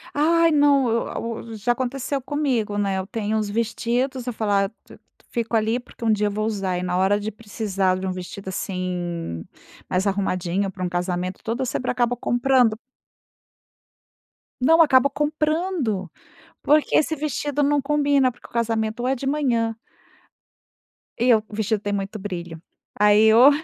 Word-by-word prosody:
Ai, 330 +3 +4
não! 285 -4 +4
Eu 230 - 0
a - - -4
u 230 0 -6
já 220 +3 0
aconteceu 260 +3 -2
comigo, 255 -8 -1
né. 195 -2 0
Eu 190 - -5
tenho 215 +1 -2
uns 210 -1 -1
vestidos, 235 +4 -1
eu 245 - -2
falo: 220 -2 -2
"Ah, 195 -1 +2
t 225 - -18 0.3
fico 230 -1 -2
ali 220 +2 +1
porque 245 -1 -10
um 225 - +4
dia 210 0 +1
eu - - -1
vou 215 +1 -2
usar", 195 -4 -1
e 180 - -3
na 180 0 -1
hora 195 +2 +3
de 210 +1 -4
precisar 200 -3 -1
de 185 - -5
um 190 - -1
vestido, 185 +2 -7
assim, 175 - -4 0.5
mais 185 +2 0
arrumadinho 190 -1 0
para 185 -1 -6
um 180 - -1
casamento 180 +1 -2
todo, 230 +3 -2
eu - - +1
sempre 250 +1 -2
acabo 245 -1 +1
comprando. 245 -2 +2 1.8
Não, 325 +6 +6
acabo 280 -3 +5
comprando! 300 - -1 0.5
Porque 300 +1 +3
esse 315 +1 +1
vestido 290 -1 -2
não 285 0 +2
combina, 285 -2 +2
porque 245 - -16
o - - -26
casamento, 225 -1 -1
ou 250 - -1
é 265 - +2
de 270 - -6
manhã 240 -6 +1 1.4
E 240 +1 +1
o - - +3
o - - -7
vestido 220 -1 0
tem 205 -1 -2
muito 200 +1 -3
brilho. 175 -4 -6 0.4
Aí, 210 +1 +6
o 245 +5 +8
225 Hz, 175 wpm, -23 LUFS, 195-265 Hz, 1.8 s, o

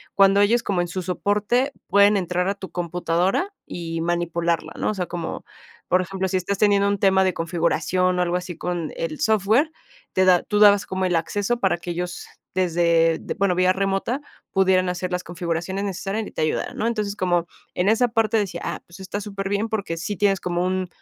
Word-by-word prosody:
cuando 195 0 +5
ellos 230 +4 +3
como 185 -3 0
en 175 - -2
su 185 +1 -3
soporte 205 +8 0 0.2
pueden 200 +1 +5
entrar 180 -1 -1
a 200 - -1
tu 190 -1 -9
computadora 175 - 0
y 165 -1 -5
manipularla, 170 -1 -1
¿no? - - -1
O - - -3
sea, 185 -3 -2
como, 170 -2 -5 0.4
por 185 - +3
ejemplo, 190 +1 -3
si 185 0 0
estás 195 +2 -2
teniendo 200 -1 +4
un 200 0 0
tema 190 -1 +4
de 185 -1 +1
configuración, 170 +2 0
o - - +3
algo 175 0 0
así 180 -1 -6
con 175 -3 -3
el 155 -2 -4
software, 220 - +2 0.4
te 185 - +3
da 180 -2 +5
tú 210 - -1
dabas 205 -1 +6
como 190 0 -2
el 180 -1 +1
acceso 205 +8 -1
para 190 -4 +2
que 175 - -8
ellos 175 +1 -5 0.3
desde 170 -2 +2
de, - - -5
bueno, 200 -2 +2
vía 185 +1 +3
remota 195 +7 -1 0.3
pudieran 185 -1 +3
hacer 180 0 -3
las 180 0 -2
configuraciones 175 +2 -3
necesarias 200 +2 -3
y - - -9
te - - -4
ayudara 155 - -1
¿no? 225 - -1
Entonces 210 -3 -2
como 175 -3 +1 0.3
en 180 +2 +2
esa 225 +3 +3
parte 225 -1 +1
decía, 185 -5 -2
ah - - -4
pues, 170 +3 -14
está 190 +2 -4
superbién 200 +1 -2
porque 200 -6 -3
sí 185 +5 -3
tienes 195 -1 +2
como 175 0 -1
un 185 0 -1
185 Hz, 205 wpm, -23 LUFS, 175-200 Hz, 0.4 s, dabas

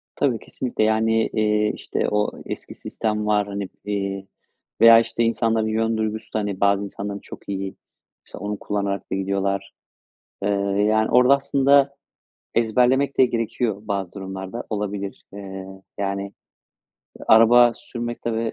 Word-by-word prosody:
Tabii, 125 -5 +1
kesinlikle. 125 -4 -3
Yani, 110 +1 +2
eee, 105 0 +1
işte, - - -2
o 105 0 +1
eski - - -7
sistem 105 -1 -3
var, 105 -1 +2
hani, 100 -1 -4 0.2
eee, 100 -1 -3 0.5
veya, 115 0 +9
işte, 115 0 -1
insanların 115 -1 +1
yön 110 +1 0
duygusu 110 0 -3
da, - - +1
hani, 100 -2 -3
bazı 100 0 +3
insanların 100 +1 -6
çok - - -12
iyi, 95 -1 -4 0.5
mesela 100 - -9
onu 105 - -3
kullanarak 100 -1 -3
da - - 0
gidiyorlar. 100 0 -2 0.7
Eee, 100 - +1 0.4
yani, 110 0 +2
orada 125 +3 +6
aslında 140 0 +3 0.6
ezberlemek 125 +4 +2
de 130 - +7
gerekiyor, 115 -2 -1
bazı 100 -4 -3
durumlarda 95 +3 -6
olabilir. 100 -2 -4
Eee, 95 -1 -8 0.3
yani, 100 0 -3 1.0
araba 120 +2 +7
sürmek, 120 0 -6
tabii 115 -1 -1
105 Hz, 135 wpm, -23 LUFS, 100-115 Hz, 1.0 s, veya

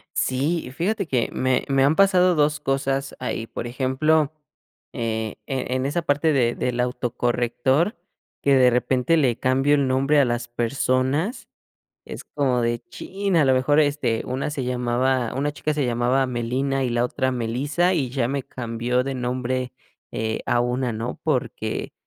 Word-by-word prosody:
Sí, 140 +4 0
fíjate 195 +3 -1
que 125 -6 0
me 130 -1 +1
me 135 -1 +3
han 145 +3 +3
pasado 185 -1 +4
2 150 0 +2
cosas 135 -1 -1
ahí, 120 -3 -3
por 115 - -6
ejemplo, 140 +5 +1 0.6
eh, 110 -3 -3
e 130 -2 -2
en 130 0 -1
esa 165 +4 -1
parte 155 +1 +2
de 120 -4 +2
del 125 -1 -2
autocorrector, 125 - 0 0.5
que 140 -1 +4
de 125 -1 +6
repente 125 +5 +2
le 130 -7 +2
cambio 135 +3 +2
el 140 -2 +1
nombre 135 +3 +3
a 140 - +5
las 120 0 -2
personas. 130 - -1 0.6
Es - - -8
como 130 -4 0
de 120 0 0
chin, 195 -1 -2
a 155 - +5
lo 130 - +4
mejor, 135 +3 +2
este, 145 -6 +1
una 130 +3 -3
se 140 -3 -3
llamaba 125 0 0
una 145 +3 -1
chica 150 +1 -2
se 145 -2 0
llamaba 125 +2 +1
Melina 130 +3 -1
y 125 - -1
la 120 0 +1
otra 130 +1 -1
Melissa, 135 +9 0
y 140 -7 0
ya 130 -2 0
me 140 +1 -2
cambió 120 +1 -2
de 135 0 -3
nombre, 125 0 -2 0.4
eh, 110 0 -2
a 120 - +2
una, 125 0 -1
¿no? 115 +3 -5
Porque 125 -7 -2
130 Hz, 165 wpm, -23 LUFS, 120-145 Hz, 0.6 s, de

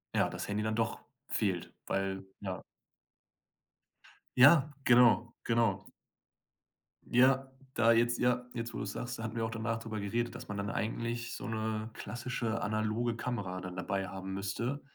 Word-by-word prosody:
ja, - - +3
das - - -5
Handy 105 +1 -1
dann 110 0 0
doch 115 0 0 0.3
fehlt, 95 -5 -1
weil 95 0 -1 0.2
ja. 95 -2 -4 1.8
Ja, 145 +2 +7
genau, 120 -1 +6
genau. 115 -1 +2 1.3
Ja, 130 +2 +4 0.2
da 115 0 +5
jetzt 120 +1 +3
ja, 125 0 +2
jetzt, 115 0 -4
wo - - -4
du's 100 -1 -3
sagst, 125 0 -4
da - - -4
hatten 110 +1 -4
wir 115 -1 0
auch 110 - -3
danach 115 0 -1
drüber 110 -2 -5
geredet, 115 +4 -1
dass - - -8
man 105 0 -4
dann 100 0 -2
eigentlich 115 +1 -2
so - - -6
'ne 110 0 -2
klassische 120 -1 -3
analoge 110 +2 0
Kamera 100 -7 -3
dann 90 0 -6
dabei 95 +1 -2
haben 95 0 -6
müsste, 115 +8 -2
115 Hz, 155 wpm, -32 LUFS, 105-120 Hz, 1.8 s, Ja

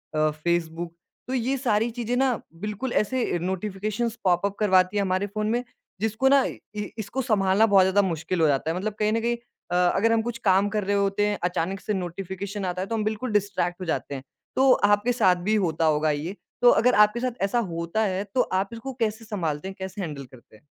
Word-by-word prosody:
अ, 155 0 +3
Facebook, 165 +1 -2 0.3
तो 255 - -3
ये 260 +1 0
सारी 230 -3 +1
चीज़ें 240 +1 -2
ना, 260 -3 +2 0.2
बिल्कुल 210 +5 -3
ऐसे 235 -3 0
नोटिफ़िकेशंस 205 +5 -2
पॉप 180 0 +2
अप 200 0 -2
करवाती 185 -1 +3
है - - +3
हमारे 185 +1 0
फ़ोन 215 +1 -3
में, 240 +1 0 0.4
जिसको 220 +4 +1
ना 275 -1 +5
इ - - -5 0.2
इ 210 -1 -3
इसको 220 +5 -3
सँभालना 205 -3 +3
बहुत 200 -3 +5
ज़्यादा 190 +2 +3
मुश्किल 170 -1 -2
हो 160 - +5
जाता 145 +2 +1
है। - - -3
मतलब 205 +3 -2
कहीं 210 0 +2
न 225 - +2
कहीं 235 +1 +1 0.4
अ, - - +1 0.2
अगर 225 +4 +3
हम 225 - +3
कुछ 235 +1 -4
काम 195 +1 +4
कर 210 0 -1
रहे 200 +1 0
होते 200 +1 +1
हैं, 205 -1 -1
अचानक 180 +2 -1
से 210 - -3
नोटिफ़िकेशन 190 +2 -4
आता 180 0 -2
है, 190 - -3
तो 230 - -2
हम 215 - -1
बिल्कुल 215 +3 -2
डिस्ट्रैक्ट 195 -3 0
हो 185 - -3
जाते 145 -3 -2
हैं। 130 - -7 0.3
तो 265 0 +5
आपके 205 +3 +3
साथ 190 -7 +4
भी 215 - +4
होता 160 -1 0
होगा 155 0 +2
ये, 155 +6 -3 0.3
तो 245 - +8
अगर 250 +2 +4
आपके 210 +3 -5
साथ 250 -3 -3
ऐसा 200 +5 +1
होता 170 +6 -2
है, 190 -1 -1
तो 210 +5 0
आप 190 -1 -1
इसको 230 +4 -6
कैसे 225 0 -1
सँभालते 170 -7 -3
हैं, 190 - -7
कैसे 190 +2 -5
हैंडल 150 -6 -5
करते 125 -3 -18
हैं? 110 - -21
200 Hz, 225 wpm, -25 LUFS, 180-220 Hz, 0.4 s, तो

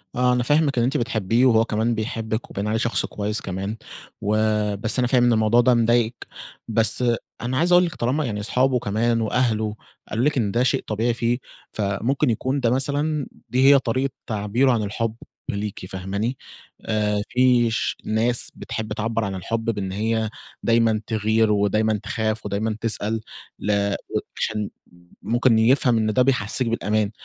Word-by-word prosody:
آه، 125 0 +3
أنا 125 0 +1
فاهمِك 145 +1 +2
إن 120 - +3
أنتِ 130 +3 +1
بتحبّيه 115 +1 +1
وهو 115 -3 +4
كمان 115 +1 0
بيحبِّك 110 0 -3
وباين 100 +2 -3
عليه 110 +1 0
شخص 115 +1 0
كويّس 105 +1 -3
كمان، 95 +3 -4 0.4
وبس 105 +1 +1
أنا 125 - +2
فاهم 125 0 +3
إن 120 -1 +4
الموضوع 110 +2 +4
ده 125 +1 +4
مضايقِك، 120 0 +1 0.4
بس 115 +2 +1 0.4
أنا 125 +2 -2
عايز 170 +5 +2
أقول 180 0 +6
لِك 170 - -5
طالما 135 +6 0
يعني 105 -4 -3
أصحابه 125 +4 +1
كمان 115 +2 0
وأهله، 110 -2 0 0.3
قالوا 115 +4 0
لِك 150 -1 +1
إن 105 -5 +1
ده 120 +4 +2
شيء 130 - +1
طبيعي 115 +3 0
فيه، 120 +1 0 0.4
فممكن 110 +8 0
يكون 130 +5 0
ده 120 -3 +2
مثلًا 145 +3 0 0.2
دي 130 +2 +2
هي 140 - +6
طريقة 130 +2 -1 0.2
تعبيره 110 +5 +1
عن 115 -3 +1
الحُب 110 +2 -2 0.3
ليكِ 100 -2 -4
فاهماني؟ 100 +7 -3 0.5
آآ 105 -1 0
في 125 -2 +3
ش 115 - -1
ناس 115 +3 0
بتحب 110 -1 -5
تعبّر 115 +1 -1
عن 100 -1 -3
الحُب 115 +5 -3
بإن 100 -4 -2
هيّ 110 +2 -1 0.3
دايمًا 115 -2 +3
تغير، 110 0 +2
ودايمًا 105 +1 +1
تخاف 110 -1 -2
ودايمًا 105 +2 -1
تسأل، 110 -1 -1 0.4
ل 100 -1 0 0.4
عشان 105 -2 -2 0.5
ممكن 120 -1 +2
يفهم 120 +1 +3
إن 110 -1 +1
ده 125 - +3
بيحسّسِك 125 -1 +1
بالأمان، 110 -2 0
115 Hz, 165 wpm, -23 LUFS, 105-125 Hz, 0.5 s, أقول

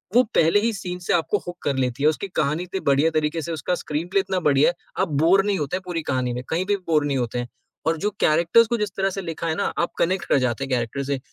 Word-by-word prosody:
वो 250 - +7
पहले 165 +5 +4
ही 230 +3 +1
सीन 180 -2 -5
से 175 - -1
आपको 170 +4 +1
हूक 175 - -6
कर 140 - 0
लेती 130 0 -1
है, 150 - +6
उसकी 160 +6 -3
कहानी 155 +4 0
इतने 180 +2 -4
बढ़िया 140 +4 +4
तरीके 155 +1 0
से 170 - -5
उसका 165 +3 -1
स्क्रीनप्ले 175 +5 -1
इतना 190 -1 -1
बढ़िया 140 +1 +4
है, 175 - -3 0.3
आप 190 - +2
बोर 190 +4 +5
नहीं 205 -1 +1
होते 150 +5 -2
पूरी 175 -2 -3
कहानी 125 -1 0
में, 125 +1 -4
कहीं 170 +3 0
भी 205 +1 +2
बोर 155 -3 +2
नहीं 140 -2 0
होते 120 -1 -2
हैं। 120 - -4 0.4
और 165 0 +2
जो 205 +5 0
कैरेक्टर्स 170 +9 +4
को 235 +1 0
जिस 210 -2 -1
तरह 195 0 +1
से 195 +1 -4
लिखा 165 -1 -4
है 160 - 0
ना, 200 - -1 0.2
आप 170 - +1
कनेक्ट 185 +1 +1
कर - - +4
जाते 125 0 -1
हैं 135 - -5
कैरेक्टर 125 +2 -1
से, 140 0 -2
165 Hz, 270 wpm, -23 LUFS, 140-190 Hz, 0.4 s, वो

